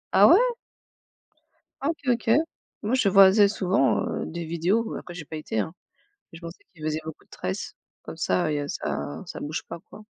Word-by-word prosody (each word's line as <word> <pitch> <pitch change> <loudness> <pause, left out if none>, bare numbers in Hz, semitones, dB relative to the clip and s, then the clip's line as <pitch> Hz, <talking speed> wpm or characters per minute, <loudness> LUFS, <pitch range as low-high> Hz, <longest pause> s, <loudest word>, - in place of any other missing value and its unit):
Ah - - +8
ouais? 355 - +8 1.4
Ah, 280 - 0
OK, 325 - -2 0.2
OK 230 -1 -4 0.5
moi 215 +4 -1
je 250 -6 +3
voyais 195 +2 +7
souvent, 190 -8 +1
heu, - - -3
des 170 +1 -5
vidéos, 175 +8 0
après 175 - -8
j'ai 165 -3 -7
pas 160 - -8
été, 155 -7 -4
hein. 160 - -2 0.6
Je 165 - -10
pensais 170 0 -10
qu'il 155 -3 -12
faisait 155 0 -1
beaucoup 160 -1 -9
de - - -39
tresses - - -5 0.3
comme - - -9
ça 95 +12 0
et 145 - -1
heu, 145 - -4
ça 145 - -4
ça - - -7
bouge 155 +3 -4
pas - - -6
quoi. 215 +1 -12
170 Hz, 195 wpm, -25 LUFS, 155-205 Hz, 1.4 s, Ah